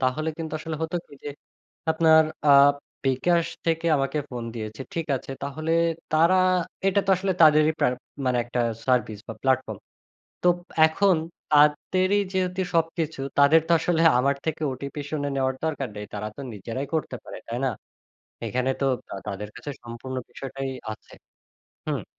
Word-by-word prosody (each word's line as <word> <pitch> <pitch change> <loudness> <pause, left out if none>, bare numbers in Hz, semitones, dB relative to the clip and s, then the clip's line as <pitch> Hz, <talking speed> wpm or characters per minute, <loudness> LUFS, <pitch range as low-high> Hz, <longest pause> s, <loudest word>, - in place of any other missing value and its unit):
তাহলে 135 +5 0
কিন্তু 160 -2 -5
আসলে 160 0 -5
হতো 160 +2 -1
কি - - -22
যে, - - -3 0.6
আপনার 160 0 +6 0.2
আ - - +6 0.5
বিকাশ 165 +6 +2 0.2
থেকে 165 0 +1
আমাকে 135 +2 -1
ফোন 120 -2 -5
দিয়েছে, 110 0 -6
ঠিক 165 -1 -2
আছে 130 - -9
তাহলে 155 +3 -3 0.4
তারা 165 +4 +5 0.5
এটা 195 +1 +3
তো - - +2
আসলে 190 +1 0
তাদেরই 155 0 +6
প্রা - - +3 0.4
মানে 125 -1 +2
একটা 120 +1 -2 0.3
সার্ভিস 115 -5 +1
বা 115 - -5
প্ল্যাটফর্ম; 130 -1 +1 0.6
তো 180 - +4 0.4
এখন 185 +3 +3 0.3
তাদেরই 155 +7 +4
যেহেতু 185 0 -1
সবকিছু 165 -3 0 0.2
তাদের 145 +3 +7
তো - - +3
আসলে 165 +1 +1 0.2
আমার 140 +2 +2
থেকে 160 0 -2
ওটিপি 140 +3 -6
শুনে 145 -2 -1
নেওয়ার 130 -1 +1
দরকার 145 -5 -2
নেই, 105 0 -6
তারা 105 +1 -3
তো - - -8
নিজেরাই 115 +7 -5
করতে 155 -5 -1
পারে, - - -8
তাই 120 - -3
না? 135 - +3 0.8
এখানে 130 +1 0
তো 140 - +1 0.4
তাদের 105 +1 -5
কাছে 145 - -6
সম্পূর্ণ 120 +2 -7
বিষয়টাই 135 +2 -5 0.2
আছে - - -14 0.7
হুম। - - -2
145 Hz, 155 wpm, -25 LUFS, 130-160 Hz, 0.8 s, তাদের